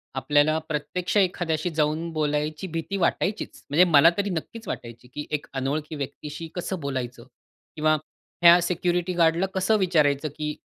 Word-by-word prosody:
आपल्याला 145 +3 +3
प्रत्यक्ष 175 +5 -3
एखाद्याशी 175 -4 +1
जाऊन 155 +2 0
बोलायची 150 +2 -1
भीती 165 +4 -3
वाटायचीचं, 185 +3 -1
म्हणजे 155 +6 +5
मला 155 +2 +8
तरी 200 0 0
नक्कीच 200 +6 -5
वाटायची, 120 +1 -7
की 150 +4 -7
एक 150 -1 -2
अनोळखी 145 +4 -2
व्यक्तीशी 150 +3 -6
कसं 180 +1 -3
बोलायचं? 130 -4 -4 0.5
किंवा 155 0 +3 0.5
ह्या 170 +1 +9
सिक्युरिटी 175 +1 0
गार्ड 165 -2 +3
ला 190 - +1
कसं 190 +3 +2
विचारायचं 155 -6 +2
की, 150 0 -2
155 Hz, 145 wpm, -25 LUFS, 150-175 Hz, 0.5 s, ह्या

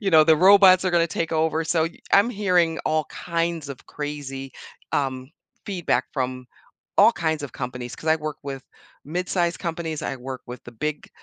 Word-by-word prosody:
You 200 -3 0
know, 160 -2 +7
the 160 0 +5
robots 190 +1 +7
are 185 - +2
gonna 170 -1 +3
take 165 0 -3
over, 160 0 +1
so 160 0 +1
y 165 +1 -6
I'm 205 +4 +5
hearing 180 -6 +1
all 155 0 +1
kinds 170 -3 -2
of 140 - -9
crazy, 140 -2 -6 0.4
um, 130 -1 -2 0.4
feedback 185 -5 0
from 130 -2 -3 0.5
all - - +8
kinds 160 -2 -1
of 140 -5 -6
companies, 125 -1 -6
'cause 160 - -6
I 160 - +5
work 155 -1 -5
with 135 -1 -6 0.4
mid-size 175 +2 -1
companies, 165 -3 -4
I 135 - -3
work 130 +1 -7
with 125 0 -9
the 120 - -11
big 150 +6 -4
160 Hz, 180 wpm, -24 LUFS, 135-170 Hz, 0.5 s, all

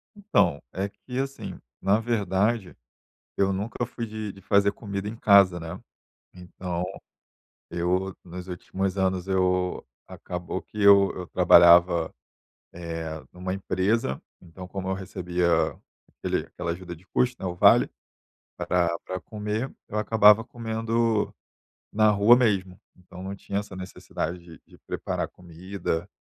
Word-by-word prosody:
Então, 140 - +1
é 95 +2 -2
que, 125 +5 -7
assim, 135 0 -5 0.2
na 100 +3 +3
verdade, 105 -2 0 0.6
eu 95 0 +2
nunca 105 +5 -3
fui 115 0 -5
de 110 -2 -5
de 95 - -15
fazer 100 +1 +3
comida 100 -1 -5
em 110 - -6
casa, 100 -5 +5
né. 80 -1 -7 0.5
Então 90 -1 -5 0.9
eu 90 +2 -1
nos 90 +1 -8
últimos 95 +1 -3
anos 95 -1 0
eu 90 -2 0 0.2
acabou 90 +1 -5
que 105 - -9
eu 100 -1 +7
eu 90 - -6
trabalhava, 85 -1 +6 0.6
eh, 80 -2 -5
numa 90 +1 -4
empresa, 95 - 0 0.2
então 90 +1 -11
como 95 0 -5
eu 95 - 0
recebia 90 -2 -2 0.6
aquele - - -3
aquela 90 -1 -5
ajuda 85 0 -8
de 90 +4 -21
custo, 125 0 +1
né, 95 - -3
o 90 - -4
vale 90 - +6 0.7
pra 85 -2 +1
pra 95 0 -4
comer, 105 +5 -4 0.2
eu 105 - -3
acabava 105 0 +6
comendo 115 -2 -1 0.6
na 110 0 +4
rua 105 +4 +6
mesmo. 100 -7 +1 0.2
Então 90 0 -12
não 95 +1 -5
tinha 100 +1 -3
essa 105 -2 -10
necessidade 90 -2 -5
de 85 -2 -14
de - - -19
preparar - - -3
comida, 90 0 -5
95 Hz, 135 wpm, -26 LUFS, 90-105 Hz, 0.9 s, eu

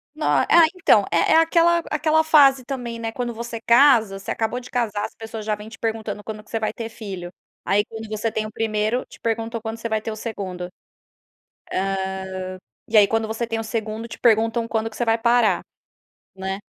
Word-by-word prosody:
No 305 - -4
ah, - - +3 0.3
então, 220 - +4
é 170 -1 +3
é - - +7
aquela 335 +1 +4
aquela 310 +1 +2
fase 275 -4 +5
também, 245 -4 -5
né, 225 -1 -3
quando 240 0 -3
você 235 0 -6
casa 235 -5 +5
você 195 - -5
acabou 230 +2 -1
de 250 - -12
casar, 215 -4 -1
as - - -8
pessoas 225 -1 -7
já 215 - 0
vêm 210 +1 -10
te 220 - -12
perguntando 220 -2 -3
quando 215 -1 -7
que - - -23
você 225 - -2
vai 215 - -2
ter 230 -1 -6
filho. 195 -6 -7 0.4
Aí 205 +1 +3
quando 220 0 -8
você 215 +1 -2
tem 215 0 -2
o 215 - -7
1º, 220 +2 -1
te - - -16
perguntam 230 0 -2
quando 225 0 -5
você 230 0 -5
vai 220 -1 0
ter 220 - -4
o 215 - -5
2º. 200 -5 -5
Hã, 180 - -5 2.2
e 220 - +3
aí 205 -1 +7
quando 225 0 0
você 225 +2 -3
tem 225 0 -2
o - - -3
2º. 220 0 -4
te - - -10
perguntam 225 0 +2
quando 225 -1 -1
que 215 - -14
você 240 - 0
vai 225 0 +3
parar, 235 -1 +3 0.7
né. 190 +1 -4
225 Hz, 210 wpm, -22 LUFS, 215-235 Hz, 2.2 s, é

